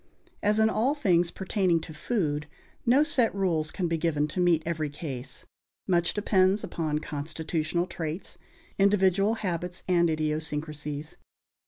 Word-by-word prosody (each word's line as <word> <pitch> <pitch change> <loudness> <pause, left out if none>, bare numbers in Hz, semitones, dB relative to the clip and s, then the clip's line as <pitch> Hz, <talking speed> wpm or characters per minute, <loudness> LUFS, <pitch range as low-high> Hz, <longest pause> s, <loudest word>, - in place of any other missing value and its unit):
As 210 +1 +2
in 220 0 +5
all 235 +6 +1
things 180 - +2
pertaining 185 -3 +1
to 160 - -8
food, 150 -4 -1 0.4
no 260 +5 +6
set 245 -9 +2
rules 170 -6 0
can 180 +1 -2
be 165 -1 -1
given 150 -3 +1
to 180 - -4
meet 175 -3 +3
every 160 -3 -1
case; 135 -3 -6 0.4
much 175 -2 +2
depends 195 -1 +3
upon 155 -3 -2
constitutional 155 +3 -2
traits, 165 0 -5 0.4
individual 195 +1 +3
habits 180 -4 -3
and 170 -2 +3
idiosyncrasies. 150 -1 -3
170 Hz, 135 wpm, -28 LUFS, 155-195 Hz, 0.4 s, no